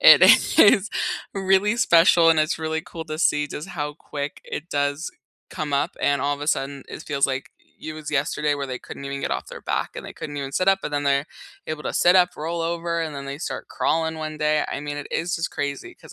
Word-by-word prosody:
it - - +9 0.4
is 200 -2 +6 0.5
really 195 +3 +2
special, 170 -6 +6
and 160 -1 +4
it's 155 +1 0
really 160 0 -2
cool 165 -1 -8
to 155 0 -6
see 150 -3 +2
just 150 +4 -7
how 150 -5 -4
quick 145 -1 -6
it 165 +4 -6
does 145 +2 -1 0.4
come 150 -2 -4
up, 140 +1 +1
and 140 -1 +2
all 145 +1 +1
of 145 - -12
a 145 - -4
sudden, 140 -3 -1
it - - -8
feels 140 -3 +1
like 130 0 -4 0.3
it 155 - -5
was 155 -1 -7
yesterday 150 +1 0
where 140 -1 -4
they 130 -1 -5
couldn't 140 - -9
even 140 0 -4
get - - -2
off - - -2
their - - -10
back - - -1
and - - -6
they - - -8
couldn't 145 -1 -7
even 140 -1 -4
sit 185 +6 +1
up, 195 0 +4
but - - -3
then 145 0 -1
they're 140 0 +2 0.4
able 150 -1 -4
to - - -4
sit 175 +1 +5
up, 180 -1 +6
roll 165 +3 -3
over, 170 0 -1
and 155 -3 -3
then 140 - -6
they 140 +1 -6
start 165 - -5
crawling 160 0 0
one 155 0 -5
day, 150 0 +2
I - - -3
mean, 145 0 -5
it 145 - -6
is 170 +2 -1
just 165 - -2
crazy 140 -2 -4
‘cause - - -15
150 Hz, 240 wpm, -23 LUFS, 145-165 Hz, 0.5 s, it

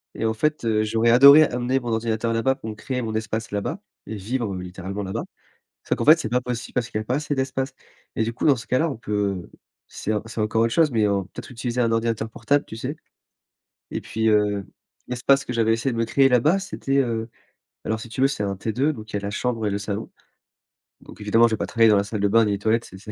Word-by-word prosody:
Et - - -4
en 110 - +1
fait, 150 +7 -1
heu, 110 -1 +2
j'aurais 115 +2 +1
adoré 140 +5 +9
amener 125 0 0
mon 120 - -5
ordinateur 115 0 -1
là-bas 130 +4 +1
pour 110 -5 -8
me 110 - -6
créer 125 +4 -4
mon 110 -2 -4
espace 110 +1 -3
là-bas 105 - -3 0.3
et 110 - -5
vivre 105 0 -3
littéralement 95 +2 -6
là-bas. 95 0 -3 0.6
Sauf - - 0
qu'en - - -2
fait 155 +2 +8
c'est 115 - -3
pas 125 +2 +2
possible 125 -2 -5
parce 125 -1 -1
qu'il - - -3
y - - -3
a - - -5
pas 125 - 0
assez 145 0 -2
d'espace 130 0 -2 0.4
et 110 - +1
du 115 - -2
coup - - -3
dans 140 - +6
ce 115 - -9
cas-là 145 +6 +1
on 140 - -4
peut 100 -4 -2 0.4
c'est 110 - -4
en 105 - -1
c'est 115 0 -7
encore 110 +1 +1
autre 115 - +2
chose 160 -3 +3
mais 110 -3 +2
en 100 -1 0
peut-être 95 - -10
utiliser 125 0 -2
un 115 - +2
ordinateur 115 -1 -1
portable 140 +6 0
tu 110 - -9
sais? 130 +6 -4 1.0
Et - - -3
puis, 110 0 -1
heu, 105 -2 +2 0.4
l'espace 135 +2 +2
que - - -3
j'avais 115 -1 +2
essayé 115 +3 0
de - - -4
me 115 - +2
créer 135 +3 +3
là-bas, 135 +9 +3
c'était, 140 -8 -2
heu 115 -3 -1 0.6
alors 110 +1 -1
si 115 - -9
tu 115 - -8
veux 135 - +5
c'est 135 -7 -3
un 100 -1 -2
T2 120 +9 0
donc 110 -2 -10
il - - -2
y - - +2
a - - -12
la 100 - -3
chambre 115 0 -2
et - - +1
le 100 - -1
salon. 100 +1 -5 0.9
Donc - - -14
évidemment 110 +3 +4
je 110 - 0
vais - - -9
pas - - -2
travailler 115 -1 +4
dans 105 - +5
la 100 - +2
salle 105 -1 -4
de 100 - +3
bains 115 +2 +5
ni 105 - 0
les - - -1
toilettes, 110 +3 +1
c'est 95 - -12
c'est 105 +2 -9
115 Hz, 260 wpm, -23 LUFS, 105-125 Hz, 1.0 s, adoré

